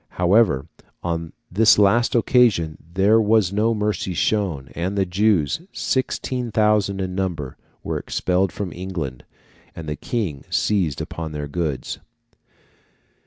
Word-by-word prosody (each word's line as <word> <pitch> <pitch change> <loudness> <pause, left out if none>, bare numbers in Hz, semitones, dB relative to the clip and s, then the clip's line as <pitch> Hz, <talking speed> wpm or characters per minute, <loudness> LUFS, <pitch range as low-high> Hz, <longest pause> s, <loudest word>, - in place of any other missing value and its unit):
However, 90 - +3 0.4
on 85 -1 -3 0.2
this 110 +4 +5
last 115 +5 +3
occasion 110 -10 +3 0.2
there 105 +4 +5
was 105 -3 +3
no 110 +3 +2
mercy 105 -3 -1
shown, 85 -10 0
and 95 +4 -3
the 95 - +2
Jews, 95 - +1
sixteen 130 -1 -2
thousand 105 -2 +2
in 95 -1 -3
number, 90 -8 -3 0.3
were - - -2
expelled 90 0 0
from 95 0 -5
England, 85 -9 -5 0.5
and 80 -2 -8
the 75 - -2
King 80 - -3
seized 90 -9 0
upon 80 -2 -5
their 75 -1 -4
goods. 75 -4 -3
95 Hz, 125 wpm, -22 LUFS, 80-105 Hz, 0.5 s, this